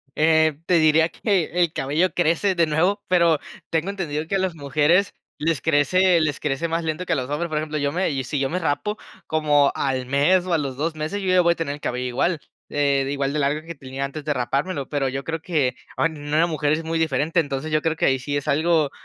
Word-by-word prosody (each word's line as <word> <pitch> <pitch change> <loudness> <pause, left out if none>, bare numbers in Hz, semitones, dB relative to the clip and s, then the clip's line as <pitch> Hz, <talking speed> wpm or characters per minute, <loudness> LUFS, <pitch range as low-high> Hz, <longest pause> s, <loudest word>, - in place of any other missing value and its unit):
eh, 160 -1 +3
te 180 - +3
diría 160 +1 +4
que 195 -7 0
el 175 -2 +1
cabello 155 +6 0
crece 175 +3 +1
de 170 -1 +3
nuevo, 170 +6 +1
pero 170 -4 +4 0.3
tengo 165 +4 -1
entendido 160 -6 -3
que 195 - -2
a - - +2
las 185 -3 -1
mujeres 150 +6 +2 0.2
les 160 -1 0
crece 165 +4 +3
les 150 -2 -1
crece 150 +3 -2
más 165 0 -1
lento 160 +3 -2
que 175 - -4
a - - +3
los 130 +1 -4
hombres, 165 +3 -2
por 155 - -2
ejemplo, 155 0 -2
yo 145 -1 0
me 180 +2 0
y 135 -2 -2
si 140 +3 -3
yo 135 -1 0
me 180 - -2
rapo 170 +7 -1 0.3
como 150 -2 +3
al 130 -2 -1
mes, 150 +8 +3
o 180 - -1
a - - +4
los 135 -3 -4
2 160 +2 -2
meses, 155 +7 -3
yo 190 - -3
ya 185 0 +5
voy 170 0 +3
a - - +1
tener 150 -4 -2
el 150 - -15
cabello 125 +1 -2
igual, 155 +7 0 0.3
eh, 140 -2 +1
igual 140 0 -1
de 150 - -1
largo 150 +3 -1
que 170 - -6
tenía 135 0 -5
antes 145 +2 -7
de 150 -1 0
rapármelo, 140 +4 -2
pero 140 -3 -1
yo 135 +1 -5
creo 160 0 -3
que, 145 -8 0 0.2
ah, - - +2
en 155 -3 -3
una 155 +3 +2
mujer 150 -2 -1
es 160 +1 0
muy 165 0 -1
diferente, 160 +1 +1
entonces 140 +1 -4
yo 155 0 +1
creo 160 -1 -1
que - - +1
ahí 135 0 +3
sí 145 +3 -2
es 145 - -5
algo 155 -1 +2
155 Hz, 250 wpm, -23 LUFS, 145-170 Hz, 0.3 s, ya